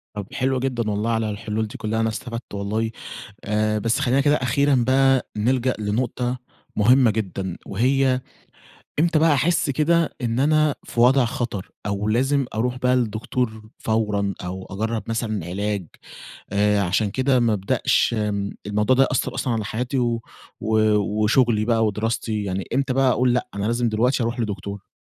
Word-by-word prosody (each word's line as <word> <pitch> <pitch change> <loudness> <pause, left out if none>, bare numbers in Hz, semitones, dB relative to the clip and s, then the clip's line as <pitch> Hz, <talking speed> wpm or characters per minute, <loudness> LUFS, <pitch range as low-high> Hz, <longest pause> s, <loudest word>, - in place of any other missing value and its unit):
طب 100 -2 -5
حلوة 130 -1 0
جدًا 120 -4 -1
والله 105 +2 -1
على 110 -1 0
الحلول 110 +1 -3
دي - - -9
كلها 110 0 -2
أنا 115 0 +1
استفدت 115 +1 -6
والله، 110 +3 -2 0.5
آآ 110 0 +1
بس 115 +6 0
خلينا 135 -1 +2
كده 145 +1 +3
أخيرًا 140 +3 +2
بقى 135 0 +3
نلجأ 125 +3 +1
لنقطة 120 +4 -1 0.4
مهمة 120 +2 +5
جدًا 95 -4 -3
وهي 130 +4 +2 0.8
إمتى 165 -1 +3
بقى 160 -1 +4
أحس 160 +2 +1
كده 160 +3 +2
إن 115 0 -1
أنا 155 +1 +3
في 120 - -5
وضع 130 +2 +5
خطر، 115 -5 -4
أو 100 +1 -2
لازم 135 +4 +2
أروح 125 +3 -1
بقى 125 0 +2
للدكتور 110 -1 -2
فورًا، 105 -3 0
أو 95 +1 -5
أجرَّب 110 +3 -2
مثلًا 110 -6 -2
علاج، 100 0 -3 0.7
آآ، 105 0 +3
عشان 100 +3 +1
كده 130 +2 +2
ما 115 -2 +2
أبدأش، 100 +3 +1
آمم، 100 -1 -1 0.2
الموضوع 105 +5 +2
ده 135 - +5
يأثَّر 130 -2 0
أصلًا 125 - -1
على 110 -2 -1
حياتي 125 +6 -2
و 120 -2 0 0.4
و 110 +1 0 0.5
وشغلي 115 -1 +3
بقى 115 -1 +2
ودراستي 105 0 -2
يعني 95 -1 -3
إمتى 135 -1 +1
بقى 135 0 +3
أقول 125 0 +2
لأ، - - 0
أنا 100 - -3
لازم 120 +1 +1
دلوقتي 120 +4 +1
أروح 120 +2 -2
لدكتور؟ 100 -2 -5
115 Hz, 165 wpm, -23 LUFS, 105-130 Hz, 0.8 s, مهمة